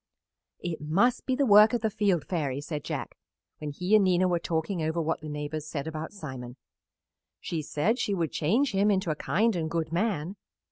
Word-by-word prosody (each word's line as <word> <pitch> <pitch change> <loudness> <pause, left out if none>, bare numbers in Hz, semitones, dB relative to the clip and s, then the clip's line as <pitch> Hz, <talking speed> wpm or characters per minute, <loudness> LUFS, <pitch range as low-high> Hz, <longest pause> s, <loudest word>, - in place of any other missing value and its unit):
"It 170 -3 -4
must 200 +14 +1
be 260 - +2
the 280 +1 +2
work 210 0 +7
of 240 - 0
the 220 -2 0
Field 195 -6 +1
Fairy," 145 -7 -2
said 145 0 -5
Jack - - -5 0.4
when 150 - -4
he 180 +8 -2
and 210 - +6
Nina 185 0 +3
were 175 -1 +1
talking 165 +2 -2
over 160 +2 -1
what 160 -1 -1
the 155 - -7
neighbors 150 +1 -4
said 145 -2 -4
about 160 0 -5
Simon. 130 - -8 0.8
"She 165 -2 -3
said 155 - 0
she 200 - 0
would 165 -5 -1
change 230 - +1
him 200 +1 +2
into 190 -5 +1
a - - -1
kind 220 +7 +1
and 160 -2 -2
good 160 -1 -2
man." 185 -1 -1
170 Hz, 200 wpm, -28 LUFS, 155-205 Hz, 0.8 s, work